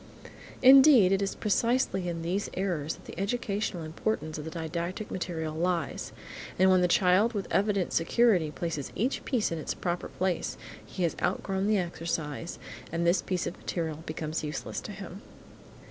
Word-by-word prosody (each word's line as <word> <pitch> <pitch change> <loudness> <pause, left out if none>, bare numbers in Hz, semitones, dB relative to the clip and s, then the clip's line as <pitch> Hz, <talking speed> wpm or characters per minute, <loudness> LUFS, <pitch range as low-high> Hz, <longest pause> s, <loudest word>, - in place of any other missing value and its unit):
Indeed, 260 -6 +8
it 195 0 +2
is 195 - -1
precisely 210 -4 +1
in 165 -1 -4
these 185 +4 -1
errors 170 -5 -1
that - - -18
the - - -9
educational 200 -4 -2
importance 155 -1 -3
of 150 - -6
the - - -4
didactic 170 +5 -4
material 165 -4 -3
lies, 170 -1 -1 0.5
and 190 +1 +5
when 185 -1 +5
the 180 - +4
child 185 +6 +4
with 200 -3 -2
evident 200 -2 +1
security 180 -1 +3
places 150 -1 -4
each 245 +7 -1
piece 235 -9 0
in 165 - -2
its - - -3
proper 175 -1 -2
place, 185 -2 -2 0.3
he 185 - -4
has 170 - +1
outgrown 195 0 0
the 215 -1 +3
exercise, 165 -3 -3 0.3
and 170 +1 -1
this 170 +2 +3
piece 185 -2 -2
of - - -4
material 160 -3 -3
becomes 155 0 -3
useless 150 +1 -4
to - - -7
him. 195 0 -8
180 Hz, 165 wpm, -29 LUFS, 165-200 Hz, 0.5 s, Indeed